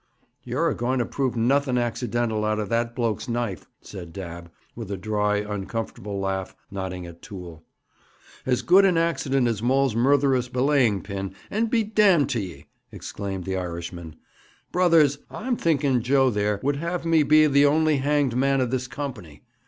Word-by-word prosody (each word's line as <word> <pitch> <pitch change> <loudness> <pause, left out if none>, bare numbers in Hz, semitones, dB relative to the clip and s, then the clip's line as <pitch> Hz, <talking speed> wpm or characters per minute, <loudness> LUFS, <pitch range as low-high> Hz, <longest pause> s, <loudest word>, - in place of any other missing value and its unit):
'You're 130 +7 0
a - - 0
going 125 +2 -1
to 120 - +1
prove 130 -1 -2
nothing 130 +2 +2
accidental 120 -2 -1
out 110 0 0
of 105 -2 -3
that 115 0 -1
bloke's 115 -1 -1
knife,' 120 -5 -3
said 90 -4 -9
Dabb, 85 -1 -8 0.3
with 115 -4 -7
a 100 - -3
dry, 105 +1 0
uncomfortable 105 0 -4
laugh, 95 -1 -3 0.2
nodding 95 -2 -5
at 85 0 -12
Toole. 90 -5 -10 0.8
'As 125 -1 0
good 190 +3 +6
an 185 -3 +3
accident 140 -6 +1
as 110 -3 -1
Maul's 130 0 +2
murtherous 130 0 +2
belaying 125 -6 +2
pin, 95 -1 -5 0.2
and 225 +2 0
be 230 -1 +2
damned 205 -8 +3
to 120 - 0
ye!' 90 -5 -7 0.3
exclaimed 95 -2 -6
the 95 +1 -3
Irishman. 85 -2 -6 0.6
'Brothers, 165 -6 +4
I'm 245 +2 -2
thinking 140 - +1
Joe 130 +2 +3
there 105 -1 0
would 140 +1 +1
have 170 +2 -3
me 165 -1 +4
be 155 +1 +5
the 140 -1 +5
only 155 0 +3
hanged 140 -2 +1
man 135 +1 +2
of 125 -2 0
this 130 -1 -1
company. 115 - -7
120 Hz, 170 wpm, -24 LUFS, 100-145 Hz, 0.8 s, good